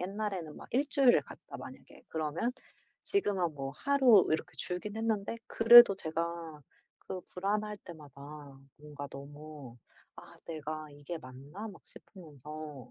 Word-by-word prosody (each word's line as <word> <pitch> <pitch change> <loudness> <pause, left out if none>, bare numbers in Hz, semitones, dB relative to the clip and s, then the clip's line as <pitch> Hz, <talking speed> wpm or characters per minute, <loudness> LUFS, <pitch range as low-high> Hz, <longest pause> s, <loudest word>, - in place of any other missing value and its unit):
옛날에는 190 -4 -4
막 - - -11
1 275 +4 +2
주일을 265 -3 +5
갔다 - - -11
만약에 - - -12
그러면 160 +8 -1 0.5
지금은 195 - 0
뭐 135 -1 -4
하루 265 -8 +5
이렇게 160 +2 -2
줄긴 190 +4 -4
했는데 225 -1 -1
그래도 235 -2 +9
제가 165 -2 -4 0.4
그 185 - -6
불안할 210 +3 -2
때마다 145 -3 -11 0.2
뭔가 145 -1 -8
너무 145 -2 -10 0.4
'아 - - -13
내가 155 -1 -5
이게 145 +4 -7
맞나?' 140 +11 -9
막 200 - -12
싶으면서 150 - -10
165 Hz, 270 characters per minute, -32 LUFS, 150-210 Hz, 0.5 s, 그래도